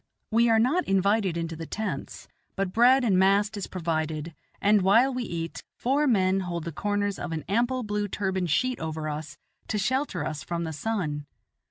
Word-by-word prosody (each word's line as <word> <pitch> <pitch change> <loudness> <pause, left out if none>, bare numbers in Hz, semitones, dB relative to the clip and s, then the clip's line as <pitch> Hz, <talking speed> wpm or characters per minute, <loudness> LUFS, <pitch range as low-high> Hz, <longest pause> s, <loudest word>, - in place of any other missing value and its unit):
We 230 +1 +4
are 225 - +5
not 265 +11 +2
invited 195 -1 +2
into 165 -1 -3
the 165 0 -7
tents, 215 -1 -5 0.3
but 195 -2 -2
bread 250 +3 +5
and 195 -6 +3
mast 200 +2 +3
is 200 - -4
provided, 160 -2 -2 0.3
and, 205 0 +4
while 230 +8 +4
we 250 - -2
eat, 170 -7 -5
four 280 +4 +1
men 190 -5 +3
hold 175 -3 -3
the 170 - -4
corners 205 +3 -1
of 170 - -4
an 160 -1 -3
ample 240 +6 +1
blue 210 -1 -1
turban 190 -2 -1
sheet 250 - +1
over 160 -1 -4
us 150 -1 -6 0.3
to 215 - -1
shelter 210 - -1
us 155 -2 -4
from 170 -1 -3
the 160 -1 -4
sun. 150 -6 -2
195 Hz, 185 wpm, -27 LUFS, 165-225 Hz, 0.3 s, are